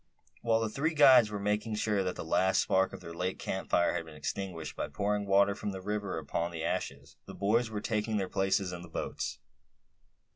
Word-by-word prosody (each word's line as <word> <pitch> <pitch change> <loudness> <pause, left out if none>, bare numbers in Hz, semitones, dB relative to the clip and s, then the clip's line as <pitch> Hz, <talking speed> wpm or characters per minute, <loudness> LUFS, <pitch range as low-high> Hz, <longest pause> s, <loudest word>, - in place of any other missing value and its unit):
While 115 -1 +2
the 110 - 0
three 155 +8 -1
guides 130 -6 +7
were 105 - -4
making 105 +2 -1
sure 105 -2 +1
that 90 -1 -2
the - - -6
last 95 +3 +3
spark 95 0 +2
of - - -9
their 85 - -8
late 90 +2 -2
camp 95 - -4
fire 85 - +3
had 85 - -2
been 80 -1 -12
extinguished, 85 -2 -4
by - - -3
pouring 105 0 -1
water 100 +1 +4
from 105 0 -4
the 95 - -5
river 105 -1 -3
upon 80 +2 -2
the 85 -2 -5
ashes, 85 - -4
the - - -9
boys 115 +4 +1
were 105 -2 -4
taking 110 -1 -1
their 95 -2 -1
places 95 -1 0
in 85 - -6
the 90 - -11
boats. - - -4
100 Hz, 215 wpm, -31 LUFS, 90-105 Hz, -, guides